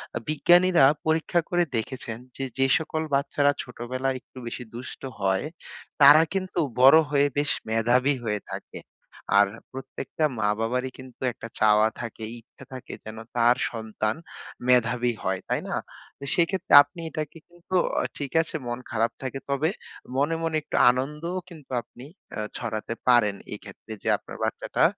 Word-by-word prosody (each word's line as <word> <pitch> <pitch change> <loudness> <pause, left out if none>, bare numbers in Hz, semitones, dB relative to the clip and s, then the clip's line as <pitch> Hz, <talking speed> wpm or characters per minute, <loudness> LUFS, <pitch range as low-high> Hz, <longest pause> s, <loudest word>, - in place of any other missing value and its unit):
আ - - +1
বিজ্ঞানীরা 175 +2 +5 0.2
পরীক্ষা 160 +2 +2
করে 175 -1 +3
দেখেছেন 115 0 -4 0.2
যে, 135 - -4
যে 135 - +3
সকল 160 0 -3
বাচ্চারা 140 +1 +2
ছোটবেলায় 130 +2 -3
একটু 130 - -20
বেশি 120 +1 -5
দুষ্ট 125 +2 -8 0.2
হয়, 95 +3 +1 0.6
তারা 145 +3 +10
কিন্তু 185 -1 -2 0.2
বড় 135 +4 +9
হয়ে 145 -1 +3
বেশ 145 0 +3 0.2
মেধাবী 120 +5 +3
হয়ে 105 -3 -1
থাকে। - - -7 0.6
আর 100 - +6 0.2
প্রত্যেকটা 135 +3 -3
মা-বাবারই 115 +5 0
কিন্তু 130 -2 -13
একটা 115 - -9
চাওয়া 110 0 +5
থাকে, 115 -1 -7 0.2
ইচ্ছা 115 - -17
থাকে 130 - -8
যেন 110 0 -8 0.2
তার 120 +1 +5 0.2
সন্তান 110 -2 -2 0.5
মেধাবী 125 -1 +3
হয়। 95 0 0
তাই - - 0
না? - - -1 0.4
তো - - -10
সেক্ষেত্রে 180 +2 0
আপনি 145 +4 -15
এটাকে 155 +1 -5
কিন্তু, 175 +2 -7 0.2
অ - - 0
ঠিক 140 -3 -4
আছে 160 - -7
মন 120 +1 -3
খারাপ 115 0 +1
থাকে 135 +1 -4
তবে 140 +3 +1 0.5
মনে, 150 +4 +2
মনে 165 -1 -1
একটু - - -6 0.2
আনন্দও 150 +8 -3
কিন্তু 155 -6 -14
আপনি 125 +3 -14 0.3
আ - - -3 0.2
ছড়াতে 115 -1 -4
পারেন 120 -5 +5 0.2
এক্ষেত্রে, 105 +1 -10
যে - - 0
আপনার - - -11
বাচ্চাটা - - -1
130 Hz, 150 wpm, -26 LUFS, 115-150 Hz, 0.6 s, তারা